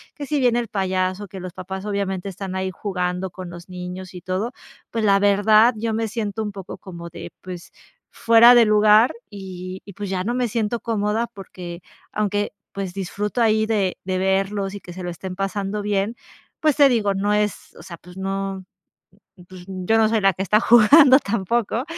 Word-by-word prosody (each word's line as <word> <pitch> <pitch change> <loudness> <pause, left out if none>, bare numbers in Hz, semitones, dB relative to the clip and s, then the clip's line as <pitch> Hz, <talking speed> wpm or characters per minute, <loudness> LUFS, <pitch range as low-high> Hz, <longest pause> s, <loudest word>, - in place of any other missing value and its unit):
que 290 - -6
si 295 +1 -1
viene 240 -1 +3
el 235 - -3
payaso, 185 0 -1
que 190 - -8
los 180 -1 -7
papás 190 +1 -7
obviamente 200 -2 -2
están 190 0 -6
ahí 190 0 -2
jugando 180 -2 -3
con 185 -1 -8
los 175 +1 -11
niños 180 +1 -7
y - - -6
todo, 185 +7 -2 0.4
pues 225 -2 -1
la 200 -1 +5
verdad, 215 +4 +5
yo 225 0 -2
me 225 0 -1
siento 220 0 -3
un 210 - -4
poco 195 -2 -8
como 170 -3 -9
de - - -9
pues, 180 -2 -9 0.4
fuera 230 +2 +6
de 235 - +7
lugar 215 +2 +5 0.2
y 185 -2 -8
y 200 - -11
pues 205 0 -6
ya 185 -1 -1
no 240 - -1
me 250 -1 +1
siento 230 +1 -1
cómoda 220 0 -1
porque, 180 -4 -9 0.3
aunque 205 -1 -1 0.2
pues, 195 -2 -4
disfruto 200 +4 -3
ahí 220 -1 +3
de 200 -5 0
de 185 -1 -1
verlos 195 +1 0
y - - -6
que 175 - -10
se 185 - -8
lo 175 - -3
estén 185 +2 -7
pasando 195 +1 -3
bien, 205 +2 -1 0.5
pues 305 -3 +3
te 285 -2 +7
digo, 215 -5 +1
no 205 +2 0
es, 210 -1 -2
o - - -12
sea, 170 - -9
pues 180 +2 -15
no, 195 0 -3 0.8
pues, 185 -1 -12
yo 190 +4 0
no 220 - +4
soy 220 0 +1
la 195 0 +5
que 190 - -3
está 210 +2 +3
jugando 260 +5 +7
tampoco. 230 +2 -1
200 Hz, 195 wpm, -22 LUFS, 185-220 Hz, 0.8 s, de